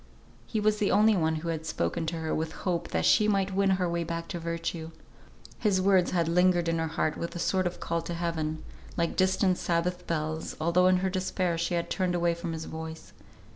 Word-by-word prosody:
He 220 - -1
was 210 0 +2
the 205 - +2
only 215 +1 +5
one 160 -3 +1
who 165 +2 -4
had 160 -1 -2
spoken 155 - -1
to 165 - -2
her 160 -1 -2
with 160 0 -2
hope, 175 -3 0
that - - -1
she 210 - +5
might 195 -2 +2
yet 190 - -6
win 195 0 +3
her 180 -1 0
way 170 0 -1
back 165 0 -4
to 175 - -4
virtue. 165 -1 -4 0.7
His 205 -4 +2
words 185 -1 +4
had 170 -3 +1
lingered 175 0 +3
in 165 0 +1
her 160 - 0
heart 155 -1 -1
with 170 - -5
a - - -3
sort 185 +1 +1
of 175 - -6
call 170 0 -1
to 170 - -2
Heaven, 160 -2 -2 0.3
like 170 -1 0
distant 185 0 +2
Sabbath 175 +1 -1
bells, 155 -1 -2
although 170 +3 +3
in 185 0 +5
her - - +2
despair 185 -2 -1
she 170 +1 -1
had 170 - -2
turned 180 -2 0
away 170 -1 +2
from 170 0 -5
his 160 0 -5
voice. 160 0 -8
170 Hz, 225 wpm, -28 LUFS, 165-185 Hz, 0.7 s, only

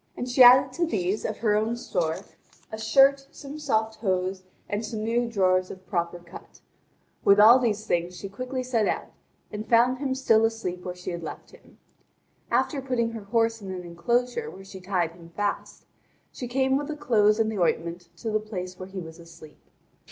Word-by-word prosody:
And 245 - -4
she 250 +1 +2
added 255 +1 +8
to 340 +3 0
these, 195 - -1
of 215 - -3
her 215 -3 +1
own 220 +3 0
store, 170 -8 -1 0.6
a 220 - -5
shirt, 275 +4 +4
some 290 0 -9
soft 220 -6 -1
hose, 185 -2 -1 0.3
and 205 +2 -2
some 215 0 -4
new 235 +1 0
drawers 185 -4 +2
of 185 0 -10
proper 175 -2 -2
cut. 175 +1 -14 0.6
With 200 +1 +5
all 230 +5 +8
these 215 -4 -1
things 175 -2 -1
she 195 - -6
quickly 255 +6 -5
set 235 -4 0
out, - - -3 0.4
and 210 +1 -6
found 245 +2 +4
him 265 -2 -1
still 225 -4 +3
asleep 225 -6 -2
where 180 -1 -5
she 180 0 -6
had 170 0 -5
left 160 - -8
him. - - -19 0.7
After 285 -4 0
putting 245 -3 -1
her 225 -3 -8
horse 225 +1 +1
in 195 - -8
an 180 -1 -6
enclosure 245 - -1
where 195 - -12
she 190 -1 -11
tied 180 -3 -1
him 170 0 -15
fast, 205 -1 -3 0.5
she 250 - -6
came 265 +2 +1
with 290 0 -4
the 310 - -4
clothes 215 -7 +3
and 220 0 +1
the 210 - -4
ointment 170 0 -1
to 225 - -4
the 215 - +1
place 185 -4 -7
where 185 0 -8
he 195 - -9
was 165 -1 -9
asleep. 165 -2 -15
215 Hz, 195 wpm, -26 LUFS, 185-245 Hz, 0.7 s, added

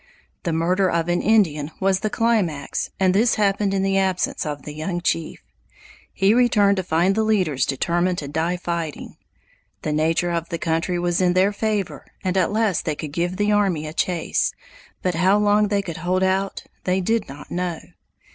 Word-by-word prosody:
The 170 - -2
murder 180 +4 +1
of 170 0 0
an 175 - +1
Indian 170 -9 +2
was 190 -1 +2
the 215 - -1
climax 205 -12 0
and 185 -1 +3
this 225 +5 +3
happened 200 -1 +1
in 195 -1 0
the 195 0 +2
absence 185 -4 -1
of 145 -2 -5
the 150 - -7
young 165 +4 -3
chief. 165 -2 -2 0.7
He 195 +2 +3
returned 210 -5 +4
to 190 - -1
find 175 +2 +2
the 220 - +1
leaders 185 -11 +1
determined 175 +6 0
to 145 - -4
die 160 +5 -1
fighting. 170 -4 -5 0.7
The 155 - -1
nature 165 +3 +1
of 170 -1 -2
the 170 - -2
country 165 +2 -1
was 175 +1 0
in 180 -1 +3
their 190 +3 +3
favor 210 -2 -2 0.2
and 185 -1 -1
at 185 -1 +2
least 215 -5 0
they 155 - -1
could 150 0 -6
give 175 +3 -1
the 205 0 +1
army 195 -7 +1
a 155 - -6
chase, 170 -1 0 0.5
but 180 - +1
how 185 +4 +3
long 210 0 +3
they 200 -1 0
could 170 -3 -6
hold 180 +3 0
out 190 +1 0 0.2
they 185 +1 +1
did 220 +1 0
not 145 +2 -11
know. 175 -2 -2
180 Hz, 190 wpm, -22 LUFS, 165-200 Hz, 0.7 s, returned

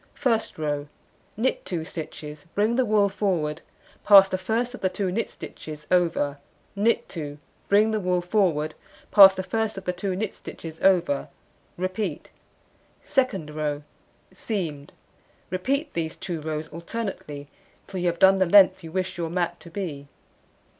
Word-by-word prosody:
First 230 -5 0
row: 145 -2 -2 0.5
Knit 245 +4 0
2 165 -3 -3
stitches, 150 -2 -8
bring 215 +3 +2
the 260 0 +2
wool 210 -2 +3
forward, 175 -6 -1 0.4
pass 195 -2 +9
the 190 - -2
first 230 +6 -1
of 250 - -9
the 185 - +2
2 190 0 -2
knit 230 +5 -1
stitches 150 -1 -9
over, 165 -5 +2 0.4
knit 215 +4 +2
2, 145 -4 -6 0.3
bring 210 +2 +4
the 215 - 0
wool 180 -2 +1
forward, 175 -5 +1 0.4
pass 195 -2 +9
the 190 - -3
first 220 +1 -2
of 190 - -7
the 180 - 0
2 190 +1 -3
knit 205 +1 -2
stitches 160 -1 -9
over, 175 -7 +3 0.5
repeat. 185 -2 -3 0.7
Second 200 - 0
row: 150 -1 -2 0.5
Seamed: 160 -10 -4 0.6
repeat 275 - -1
these 160 -1 -3
2 170 -4 -4
rows 155 0 -3
alternately 170 -4 -6 0.4
till 190 -1 -6
you 180 - 0
have 170 0 0
done 190 +2 +6
the 185 - +3
length 190 0 +6
you 165 - -8
wish 185 0 -2
your 165 -1 -2
mat 175 0 -1
to 170 - -13
be. 160 -7 -5
185 Hz, 155 wpm, -25 LUFS, 160-205 Hz, 0.7 s, pass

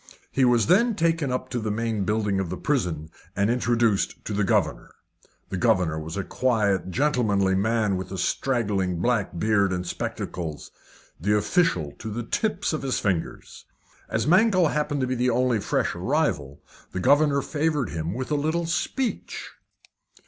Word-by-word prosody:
He 135 - +2
was 120 -3 +4
then 220 +7 +4
taken 165 -5 +1
up 130 0 -3
to 125 - -2
the 110 -1 -3
main 110 -1 -1
building 105 -2 0
of 95 -3 -2
the 90 - -4
prison, 85 - -1 0.2
and 100 +3 +2
introduced 120 -4 +1
to 105 - -3
the 105 +1 +1
governor. - - 0 0.6
The - - -3
governor 90 -8 +2
was 80 +3 -6
a 95 - -1
quiet, 105 -6 0
gentlemanly 105 - +1
man, 105 0 +1
with 95 - -6
a 95 - -4
straggling 100 -4 0
black 105 -3 0
beard 100 0 +2
and 90 0 -2
spectacles 85 -2 -5 0.5
the 105 +6 +1
official 105 - +1
to 110 - -5
the 120 +3 -3
tips 205 - -1
of 155 - -2
his 135 -2 -1
fingers. 95 -6 -3 0.4
As 110 - 0
Mankell 185 0 +4
happened 145 -1 -1
to - - +2
be 130 - -1
the 125 0 +1
only 125 -1 +2
fresh - - 0
arrival, 85 - -1 0.3
the 90 - -2
governor 140 +6 +3
favoured 150 -3 0
him 80 +3 -3
with 130 +3 -4
a - - +3
little 160 +4 0
speech. 235 +9 -3
115 Hz, 165 wpm, -25 LUFS, 95-140 Hz, 0.6 s, was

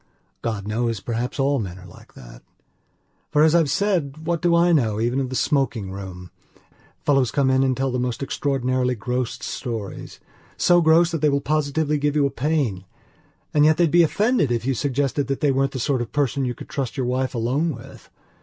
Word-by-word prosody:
God 110 -4 -3
knows, 115 0 -1
perhaps 120 +5 -4
all 140 +1 +2
men 95 -4 -5
are 95 - -13
like 85 - -16
that. - - -13 0.9
For 150 0 +3
as 160 0 +4
I've 165 -4 +3
said 160 -4 -1
what 170 -1 -1
do 175 -1 +3
I 170 +1 +4
know 115 -10 +2
even 120 +4 0
of 130 -2 -2
the 130 - -5
smoking 130 -10 0
room? 95 -2 -8 0.7
Fellows 135 -4 +3
come 135 0 +1
in 130 0 +3
and 130 -2 +1
tell 135 0 0
the 125 - -1
most 125 +1 -2
extraordinarily 130 -2 0
gross 125 +3 -3
storiesso 120 - -2
gross 165 +2 +4
that 165 - -3
they 150 - +4
will 140 0 +1
positively 150 +1 0
give 145 0 0
you 145 -2 +3
a 140 - 0
pain. 135 -9 -1 0.7
And 150 - +4
yet 155 +1 +5
they'd 170 -4 +3
be 175 - +6
offended 205 - +2
if 115 -1 -1
you 135 - +1
suggested 140 +2 -1
that 135 -1 -2
they 145 -3 +2
weren't 135 +1 +1
the 130 - -4
sort 130 +1 0
of 120 - -5
person 140 -2 0
you 125 -1 -3
could - - -10
trust 135 -2 -4
your 130 - -1
wife 130 +1 -1
alone 130 +8 0
with. 130 - -12
135 Hz, 200 wpm, -22 LUFS, 120-150 Hz, 0.9 s, be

